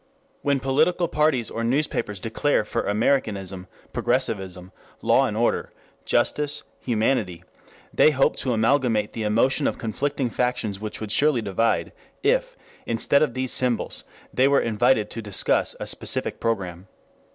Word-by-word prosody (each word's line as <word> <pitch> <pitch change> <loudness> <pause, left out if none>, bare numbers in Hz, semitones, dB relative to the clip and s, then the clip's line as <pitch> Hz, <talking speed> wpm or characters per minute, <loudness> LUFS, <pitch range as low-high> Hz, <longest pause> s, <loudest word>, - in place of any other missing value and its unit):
When 140 -1 +1
political 155 +7 +2
parties 150 -7 +1
or 115 - -3
newspapers 115 -5 -1
declare 115 +3 0
for 115 +2 -2
Americanism, 100 -4 0 0.3
Progressivism, 95 -8 -1 0.3
Law - - +4
and - - -4
Order, - - 0 0.3
Justice, 150 0 0 0.2
Humanity, 110 -7 0 0.5
they - - +6
hope 135 -3 +2
to 130 - -1
amalgamate 115 -2 +2
the 115 - -4
emotion 115 +7 +2
of - - -2
conflicting 130 +2 -2
factions 125 -5 -1
which 105 0 -6
would 110 -1 -4
surely 140 -2 +3
divide, 110 +3 0 0.3
if, - - +1 0.3
instead 115 +4 +2
of 145 -6 +1
these 130 -1 -1
symbols, 125 -2 -1 0.3
they 130 +1 +4
were 140 0 +4
invited 110 -1 +2
to 115 - -5
discuss 105 -3 0
a - - -4
specific - - -2
program. 95 -5 -2
115 Hz, 140 wpm, -24 LUFS, 105-140 Hz, 0.5 s, they